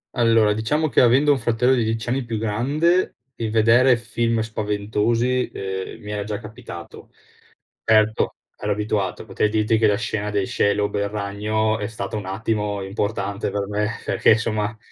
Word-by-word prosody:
Allora, 115 -3 +4
diciamo 145 +9 0
che - - +2
avendo 135 +5 +5
un 135 - +2
fratello 120 +3 +2
di 120 -3 +1
10 115 +1 -2
anni 130 0 -1
più 115 -1 -3
grande, 140 - +1 0.2
il 115 -2 -3
vedere 115 +3 +5
film 115 -1 -1
spaventosi, 110 +3 0
ehm, 95 -1 -5
mi 105 0 -7
era 105 -1 -3
già 105 -1 -3
capitato. 105 -5 -10 0.7
Erto, 110 -1 +3 0.2
ero 105 - -3
abituato, 105 -3 -2
potrei 105 - 0
dirti 110 +1 +1
che 110 - +4
la 105 - +3
scena 105 -2 -2
dei 100 -2 0
Shelob 100 +1 0
er 100 0 -1
ragno 105 +1 -1
è 105 - -2
stata 110 -2 -5
un 100 -3 -4
attimo 105 0 -2
importante 100 0 -2
per 100 -1 -2
me 105 +1 -1 0.2
perché 110 - +4
somma 110 -1 -2
110 Hz, 165 wpm, -22 LUFS, 105-115 Hz, 0.7 s, avendo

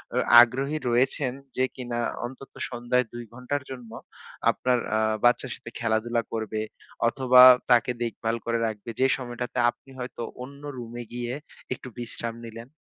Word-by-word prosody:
অ - - +1 0.2
আগ্রহী 135 +5 +1
রয়েছেন 125 +2 +1 0.2
যে 130 - +3
কিনা 120 -2 -4 0.3
অন্তত 135 +2 -9 0.2
সন্ধ্যায় 125 0 0
২ 120 0 -6
ঘন্টার 125 +3 -3
জন্য 125 -3 -8 0.6
আপনার 125 -1 +1 0.2
আ - - +2 0.2
বাচ্চার 120 +1 +3
সাথে - - -10
খেলাধুলা 115 +1 +1
করবে 110 -1 -2 0.5
অথবা 125 +1 +6 0.3
তাকে 120 0 +5
দেখভাল 115 0 -2
করে 115 0 0
রাখবে? 110 +1 -6
যে 130 - +5
সময়টাতে 125 -1 -5
আপনি 120 +3 -11
হয়তো 125 -1 -6 0.2
অন্য 140 +2 -11 0.2
রুমে 120 0 -6
গিয়ে 120 0 -3 0.4
একটু 130 - -10
বিশ্রাম 115 -1 -5
নিলেন? 115 +2 -9
120 Hz, 145 wpm, -26 LUFS, 115-125 Hz, 0.6 s, অথবা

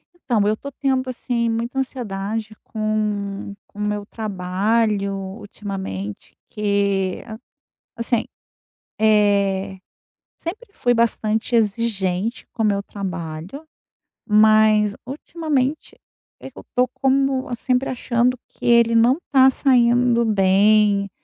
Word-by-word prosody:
Então 245 -10 0
eu 215 - +2
tô 280 - -8
tendo 265 -1 -1
assim 240 -2 -1
muita 235 +3 -2
ansiedade 220 -4 -4
com 210 -2 -2
com 205 - -15
o - - -3
meu 210 0 -2
trabalho 205 +1 -1
ultimamente, 190 - -7
que 200 -3 0 0.7
assim, 235 0 -1 0.7
eh, 200 -3 +2 0.6
sempre 415 +9 -7
fui 245 -10 +1
bastante 225 0 0
exigente 210 -2 0
com 225 - -3
o - - +3
meu 200 -1 +1
trabalho, 185 - -6 0.6
mas 215 -1 +4
ultimamente 295 0 -3 0.4
eu - - -11
tô 250 0 +3
como 270 0 0
sempre 255 +2 0
achando 250 0 0
que - - -12
ele 235 -1 +4
não 235 +4 +4
está 265 -2 +5
saindo 245 -2 +3
bem, 200 0 +3
220 Hz, 105 wpm, -21 LUFS, 200-245 Hz, 0.7 s, está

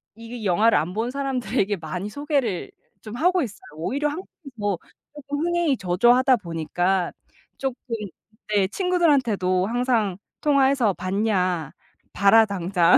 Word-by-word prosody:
이 230 -1 -8
영화를 210 +2 +4
안 165 +5 -1
본 225 +3 -2
사람들에게 250 -7 -1
많이 175 +5 -5
소개를 275 - -2 0.3
좀 220 +1 -8
하고 360 +6 +2
있어요. 210 -5 -7 0.2
오히려 275 - -1
한국이 315 -2 -9
더 205 -3 0 0.4
쪼끔 285 0 -5
흥행이 345 -6 +1
저조하다 240 +8 +4
보니까 175 +1 -1 0.4
쪼끔 265 -2 -3 0.8
네 195 -2 +3
친구들한테도 255 - +1
항상 230 -5 0 0.2
통화해서 275 -6 +3
"봤냐? 185 -5 -1 0.4
봐라 220 +3 +6
당장." 180 -3 +3
220 Hz, 285 characters per minute, -24 LUFS, 185-270 Hz, 0.8 s, 봐라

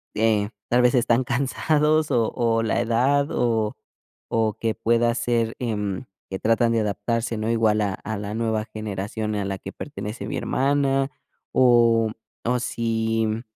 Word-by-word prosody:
eh, 110 -2 +2 0.2
tal 125 +1 +4
vez 125 0 +4
están 120 +1 +3
cansados 150 +5 +1
o 115 -2 +2
o, 115 -1 +1
la 110 +1 +1
edad, 130 +5 +2
o 110 -3 0 0.6
o 110 -2 +1
que 115 -1 -1
pueda 115 +1 +2
ser, 115 -2 0
em, 105 -1 -2 0.2
que 95 - -3
tratan 115 +1 +2
de 115 - +2
adaptarse, 115 +2 -1
¿no? 110 +1 -2
Igual 110 -2 +2
a 100 -2 0
a 110 +2 -5
la 105 +1 -5
nueva 110 -1 -1
generación 105 +1 -3
y - - -1
a 100 - -2
la 95 0 -3
que - - -7
pertenece 105 +3 -6
mi - - -3
hermana, 135 0 +1 0.4
o 115 -3 +4 0.3
o 125 +1 +1
si, 115 -2 0
mm 110 +1 -2
115 Hz, 165 wpm, -24 LUFS, 110-120 Hz, 0.6 s, tal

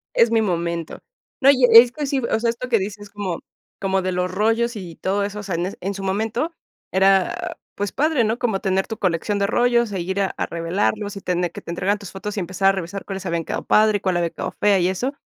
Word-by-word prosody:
Es 230 0 +5
mi 225 -1 +3
momento. 170 -4 -2 0.4
No, 275 0 +7
y 260 -2 +3
es 235 +2 +9
que 295 +1 -3
sí, 275 0 0
o 235 -2 0
sea, 230 0 +2
esto 235 +2 -6
que 230 - +3
dices 205 +1 -6
como 195 -5 -4 0.4
como 190 -1 0
de 185 0 -1
los 180 0 -1
rollos 225 +4 +1
y 175 -5 -8
todo 195 +2 -1
eso, 205 +1 -5
o - - -5
sea, 195 -4 -4
en 175 +3 -2
en 195 +2 -3
su 195 - -6
momento 220 - -1 0.4
era, 190 0 +2 0.2
pues, 205 -1 -2
padre, 295 -4 +2
¿no? 225 +2 0
Como 220 -6 0
tener 190 0 0
tu 220 - -6
colección 185 +3 0
de 200 - +2
rollos 235 0 +2
e 190 - -2
ir 190 +3 -2
a 195 - 0
a - - -1
revelarlos 200 +5 -1
y - - -5
tener 180 -2 -1
que - - -8
te - - -8
entregaran 195 +4 0
tus 200 -2 -9
fotos 205 +2 -6
y - - 0
empezar 190 +2 +2
a - - +3
revisar 195 +1 -5
cuáles 195 -1 -6
habían 170 -1 -1
quedado - - -4
padre 215 -1 +4
y - - -20
cuál 185 -2 0
había 170 -1 0
quedado - - -5
fea 205 -2 +4
y 175 - +2
eso. 245 +10 -2
200 Hz, 250 wpm, -22 LUFS, 185-225 Hz, 0.4 s, es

